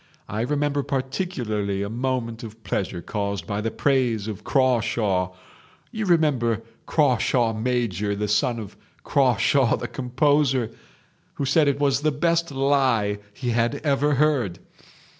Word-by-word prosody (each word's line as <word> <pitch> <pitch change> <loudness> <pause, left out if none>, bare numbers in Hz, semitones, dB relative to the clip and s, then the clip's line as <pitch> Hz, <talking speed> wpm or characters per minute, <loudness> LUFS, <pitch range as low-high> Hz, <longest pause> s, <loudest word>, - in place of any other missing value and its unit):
I 105 +2 -3
remember 145 +3 0
particularly 130 - -2
a - - -3
moment 120 -1 -2
of 110 -1 -10
pleasure 90 -3 -3
caused 100 -2 -3
by 105 -1 -2
the 115 - -1
praise 120 -6 +1
of 105 -3 -6
Crawshaw—you 115 - -1
remember 130 -10 +2 0.2
Crawshaw 125 -5 +2
major, 110 -4 -1
the 105 +1 -2
son 115 +4 +1
of 105 -4 -8 0.3
Crawshaw 130 0 +3
the - - -4
composer?—who 135 0 -1
said 145 +3 +3
it 140 0 +1
was 140 -1 +2
the 155 +1 +2
best 170 +3 +1
lie 135 -7 +1 0.2
he 125 -2 -2
had 115 +3 +1
ever 145 0 +2
heard. 135 - +1
125 Hz, 125 wpm, -24 LUFS, 110-140 Hz, 0.3 s, Crawshaw